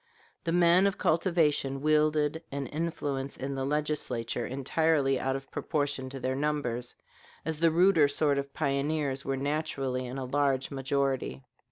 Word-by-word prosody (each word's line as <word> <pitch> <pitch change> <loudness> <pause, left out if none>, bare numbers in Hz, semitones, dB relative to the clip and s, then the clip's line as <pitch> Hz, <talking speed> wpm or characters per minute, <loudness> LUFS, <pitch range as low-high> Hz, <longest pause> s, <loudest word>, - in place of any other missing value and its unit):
The 165 - 0
men 175 +2 +5
of 195 - -1
cultivation 155 -5 +1
wielded 155 +1 +2
an 140 0 -3
influence 145 -3 -3
in 135 +1 -4
the 135 -1 -2
Legislature 135 -5 -2
entirely 140 +1 +1
out 135 0 -1
of 135 0 -7
proportion 145 -4 -1
to 135 0 -7
their 130 +1 -1
numbers, 135 -5 -2 0.5
as 160 -1 -3
the 165 0 +5
ruder 170 -2 +5
sort 145 0 +1
of 140 0 -5
pioneers 140 -1 -1
were 135 0 -1
naturally 135 -3 -2
in 125 +2 -6
a 135 - -3
large 135 0 0
majority. 135 -1 -1
140 Hz, 150 wpm, -29 LUFS, 135-155 Hz, 0.5 s, men